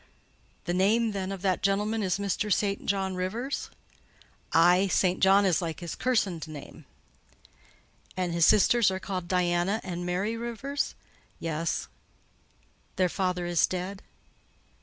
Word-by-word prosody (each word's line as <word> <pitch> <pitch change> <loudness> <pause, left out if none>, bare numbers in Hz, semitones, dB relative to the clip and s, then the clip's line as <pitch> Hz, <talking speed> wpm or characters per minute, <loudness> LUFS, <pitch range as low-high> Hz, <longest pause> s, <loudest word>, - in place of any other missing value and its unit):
"The 175 - -1
name, 215 +5 +2
then, 195 -1 -3
of 195 -1 -6
that 185 -2 +1
gentleman, 210 +3 +1
is 185 -2 0
Mr. 200 +1 -2
St. 200 0 0
John 195 -1 0
Rivers?" 215 +10 -3 0.8
"Aye; 180 +4 +5
St. 185 -1 +1
John 195 +1 +5
is 185 -3 +2
like 165 -2 -4
his 170 -2 -5
kirstened 200 -10 0
name." 150 -3 -10 1.3
"And 180 -2 -1
his 170 0 +2
sisters 225 +1 +5
are 190 0 -3
called 185 -2 -4
Diana 180 +3 +1
and 175 -2 -5
Mary 190 +5 -1
Rivers?" 235 +5 -3 0.4
"Yes." 165 0 -2 1.1
"Their 185 -1 +2
father 180 -1 -1
is 175 -1 +2
dead?" 185 +2 -4
190 Hz, 135 wpm, -28 LUFS, 175-205 Hz, 1.3 s, Aye